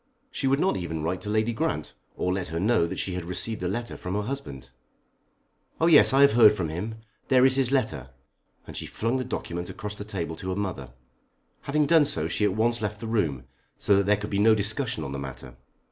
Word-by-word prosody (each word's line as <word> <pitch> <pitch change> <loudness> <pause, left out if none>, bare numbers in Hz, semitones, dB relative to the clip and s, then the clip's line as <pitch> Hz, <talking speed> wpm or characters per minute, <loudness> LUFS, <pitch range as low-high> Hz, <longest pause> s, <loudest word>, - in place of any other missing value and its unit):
She 135 - -2
would 135 +1 +2
not 190 - +1
even 80 -4 -4
write 90 +3 -2
to 105 - -6
Lady 110 +2 +1
Grant, 110 - -2 0.2
or 90 - -1
let 95 -2 -2
her 80 +2 -3
know 105 -3 +2
that - - -6
she 95 - -2
had 90 -1 -4
received 90 +5 -4
a 90 - -1
letter 115 +5 -3
from 90 +2 -5
her 105 - -1
husband. 70 - -6 1.1
"Oh, 160 - +3
yes; 165 -3 +7
I 135 +1 +4
have 140 -5 +6
heard 110 -3 +7
from 90 -6 -3
him. 100 +8 -4 0.3
There 130 -1 +5
is 130 0 +4
his 135 -2 +1
letter," 110 - -1 0.6
and - - -10
she - - -4
flung 115 +4 -1
the 130 - -2
document 90 -8 -5
across 105 0 -6
the 105 - -7
table 90 -6 -4
to 95 - -6
her 95 - -1
mother. 95 -11 -4 0.8
Having 150 +2 +2
done 160 0 +5
so 80 - -1
she 105 - 0
at 100 -2 +1
once 115 +1 +1
left 105 -1 -3
the 115 - -6
room, 85 - -1 0.3
so 100 - +3
that 100 0 +1
there 105 0 +3
should 105 +1 -6
be 100 - 0
no 110 +1 +5
discussion 105 +1 -2
on 70 - -5
the 70 - -4
matter. 65 -2 -8
105 Hz, 235 wpm, -26 LUFS, 85-120 Hz, 1.1 s, yes